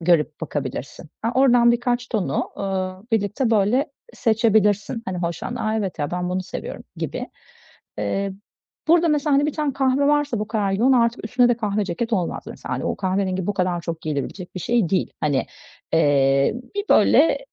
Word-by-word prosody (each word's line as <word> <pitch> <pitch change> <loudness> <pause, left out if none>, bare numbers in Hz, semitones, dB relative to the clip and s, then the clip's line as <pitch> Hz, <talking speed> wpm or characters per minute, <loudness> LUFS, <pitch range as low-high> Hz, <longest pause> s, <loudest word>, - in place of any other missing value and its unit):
görüp 160 -3 +2
bakabilirsin. 145 0 -5
Aaa, 230 - +1
oradan 240 -3 +5
birkaç 245 +1 -1
tonu, 215 -5 -1
ııı, 190 -1 -3
birlikte, 220 +4 +1
böyle, 225 +6 +3 0.3
seçebilirsin. 220 -1 +2
Hani, 185 -1 -3
hoşlandığın, 180 +8 -3
"A, 215 0 0
evet 195 -6 -3
ya! 145 -1 -2
Ben 180 0 -2
bunu 185 0 -1
seviyorum." - - -7
gibi. - - -4 0.7
Eee, 195 - -1 0.6
burada 335 0 +5
mesela, 295 -1 +2
hani, 285 +2 +3
bir 305 - -1
tane 300 -2 -1
kahve 270 +1 +2
varsa 295 -5 +1
bu 215 - -3
kadar 205 -4 0
yoğun, 240 +7 +3
artık 235 -2 +2
üstüne 245 +2 +3
de 240 - +2
kahve 210 -2 -1
ceket 225 +6 -3
olmaz 180 -5 -1
mesela, - - -6
hani, - - -4
o - - -1
kahverengi 185 -1 -1
bu 205 - 0
kadar 180 -2 0
çok 165 -1 -4
giyilebilecek 155 +4 -4
bir - - -3
şey 230 -2 +1
değil. 185 +2 0
Hani, 145 -3 +1 0.5
eee, 140 -3 +3 0.2
bir 405 - -1
böyle, 325 - +5
205 Hz, 175 wpm, -22 LUFS, 180-240 Hz, 0.7 s, oradan